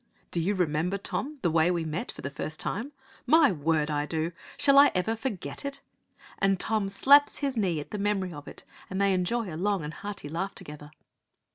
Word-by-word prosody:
'Do 170 - 0
you 200 +5 0
remember, 175 +2 0
Tom, 285 +9 -3
the 170 - +2
way 160 +1 +3
we 170 -2 0
met 155 +3 -3
for - - -12
the 140 - -4
first 155 +2 -5
time?' 235 +8 -3 0.4
'My 315 -2 +6
word, 155 -1 0
I 145 0 -1
do! 160 +1 -2 0.3
Shall 275 -1 +6
I 285 - +7
ever 200 +5 0
forget 225 -5 -4
it?' 280 0 -3 0.6
And 195 -2 +2
Tom 215 -1 +1
slaps 280 +8 +5
his 275 -2 -2
knee 185 -8 0
at 145 - -9
the 210 - -4
memory 195 -3 -1
of 145 -2 -10
it, - - -10 0.3
and 190 - -3
they 200 -1 +3
enjoy 185 +1 -1
a - - -5
long 195 +1 0
and 150 +2 -5
hearty 200 -6 -7
laugh 180 +6 -3
together. 150 0 -8
190 Hz, 210 wpm, -28 LUFS, 160-220 Hz, 0.6 s, I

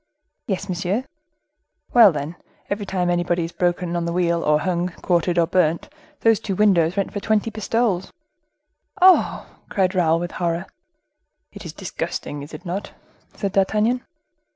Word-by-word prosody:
"Yes, 195 -1 -2
monsieur." 185 +5 -1 0.9
"Well, 230 -5 +8
then, 150 +2 -5 0.4
every 205 0 -2
time 180 -2 0
anybody 175 0 0
is 165 - -5
broken 175 -1 -1
on 170 -1 -1
the 170 - -2
wheel 170 -1 +1
or 150 0 +3
hung, 180 0 0 0.2
quartered, 175 0 +1
or 170 - +4
burnt, 170 -1 +1 0.3
these 225 -2 +4
two 200 -3 -3
windows 185 -3 +3
let 200 - 0
for 205 - -2
twenty 220 +1 0
pistoles." 215 -3 -1 0.9
"Oh!" 370 0 +5 0.3
said 185 -2 +2
Raoul, 165 -3 +2
with 175 0 -4
horror. 170 -1 -2 0.9
"It - - -11
is - - -6
disgusting, 145 0 -5
is 145 - -10
it 155 - -10
not?" 185 +4 -4 0.4
said 200 -2 -2
D'Artagnan. 215 +6 +1
180 Hz, 155 wpm, -22 LUFS, 170-200 Hz, 0.9 s, Well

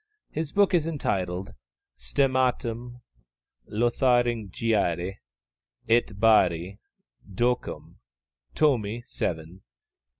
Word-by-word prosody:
His 155 -2 -3
book 200 -1 +3
is 165 -3 +2
entitled 95 - -2 0.4
_Stemmatum 125 -3 -1 0.7
Lotharingiae 115 - +1 0.7
et 115 -3 +2
Barri 95 -4 +3 0.5
ducum, 120 +5 -2 0.6
Tomi 120 -6 +1
VII. 85 -3 -4
115 Hz, 65 wpm, -26 LUFS, 95-125 Hz, 0.7 s, book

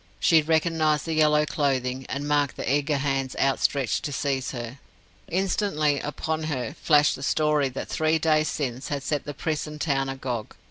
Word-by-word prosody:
She 160 -2 +5
recognized 160 -1 +1
the 165 - -2
yellow 150 -1 +4
clothing, 130 -3 -1
and 140 +2 -3
marked 145 -2 +1
the - - -4
eager 145 +3 +1
hands 135 -1 -1
outstretched 135 -1 +1
to 145 - -3
seize 135 -2 -1
her. 120 +1 -6 0.5
Instantly 175 -5 +1
upon 155 +1 -3
her 135 -4 -3
flashed 150 -2 +4
the - - -10
story 150 -1 +2
that 130 - -6
three 160 0 +1
days 155 -1 +2
since 130 -3 -3
had 140 -2 -3
set 150 -1 -2
the 145 - -6
prison 150 -1 -3
town 135 -3 0
agog. 130 -4 -4
145 Hz, 170 wpm, -25 LUFS, 135-155 Hz, 0.5 s, She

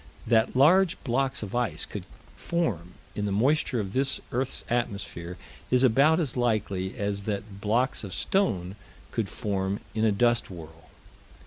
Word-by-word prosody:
That 115 +1 +3
large 170 +7 +5
blocks 135 0 0
of 100 - -7
ice 120 -5 -1
could - - -7 0.3
form 100 - -2 0.2
in 105 - -2
the 100 - -1
moisture 125 +4 +2
of 100 -2 -4
this 135 +1 +1
earth's 130 +2 -1
atmosphere 100 -7 -3 0.3
is 125 0 +3
about 140 +7 +5
as 150 -8 -1
likely 105 -6 0
as 100 -1 -2
that 100 -1 -4
blocks 115 +5 +1
of 100 - -6
stone 95 - 0 0.4
could - - -1
form 100 -1 -2
in 110 0 0
a 110 - +4
dust 120 +3 +2
whirl. 80 -3 -11
110 Hz, 150 wpm, -27 LUFS, 100-130 Hz, 0.4 s, large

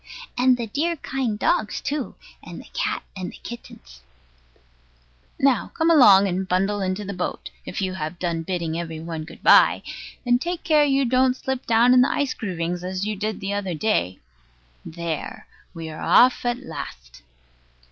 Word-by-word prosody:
And 250 0 +4
the 235 - -3
dear 310 +10 -1
kind 260 -7 -3
dogs 210 0 0
too, 285 -2 -4 0.3
and - - -10
the - - -12
cat - - -2
and 185 -2 -5
the - - -13
kittens. 65 - -11 1.4
Now, 270 -3 +2
come 325 +1 +2
along, 200 -10 +7
and 190 +1 -2
bundle 195 +3 0
into 190 +2 -2
the 200 - -5
boat, 180 -1 -4 0.2
if 180 - -3
you 185 -1 -2
have 160 -1 -5
done 170 -2 -2
bidding 170 -2 -3
every 165 -2 -5
one 160 -1 -6
good - - -14
bye; - - +6 0.4
and 245 0 +3
take 345 +1 -3
care 305 -3 +4
you 275 -1 +2
don't 255 +1 +2
slip 265 -1 -4
down 235 +2 +5
in 250 - +6
the 255 - +3
ice 285 -2 0
groovings, 175 -4 -4
as 185 +2 -3
you 215 0 -2
did 215 +2 -3
the 195 +1 -2
other 195 -4 -2
day. 95 - 0 0.7
There, 165 -1 -5 0.3
we 165 -2 -7
are 155 - -9
off 250 0 +4
at 240 0 0
last. - - -9
200 Hz, 175 wpm, -23 LUFS, 170-255 Hz, 1.4 s, along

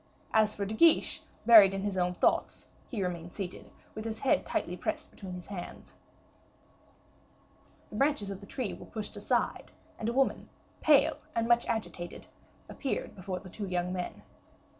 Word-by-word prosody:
As 215 -1 +4
for 200 - -2
De 205 - -4
Guiche, 325 +8 +4 0.2
buried 210 -5 +9
in 195 - -3
his 200 -1 -1
own 180 -1 +1
thoughts, - - +1 0.2
he 215 -6 -2
remained 175 -1 -4
seated, 190 -3 -6 0.2
with 215 - -6
his 225 0 -5
head 270 - +2
tightly - - -1
pressed - - -3
between 185 -3 -8
his 180 - -8
hands. 190 -3 -8 2.0
The 210 - -6
branches 275 -7 +1
of 195 - -6
the 200 - -11
tree 245 -4 -3
were - - -10
pushed 215 -2 -6
aside, - - -1 0.3
and 225 - -1
a - - -1
woman, 270 +1 +1 0.3
pale 295 -3 +5 0.2
and 230 0 +1
much 235 0 +4
agitated, 180 -6 -4 0.4
appeared 275 - -3
before 185 -1 -5
the 190 - -11
two 205 0 -5
young 180 0 -1
men. 180 -1 -5
205 Hz, 165 wpm, -30 LUFS, 185-230 Hz, 2.0 s, buried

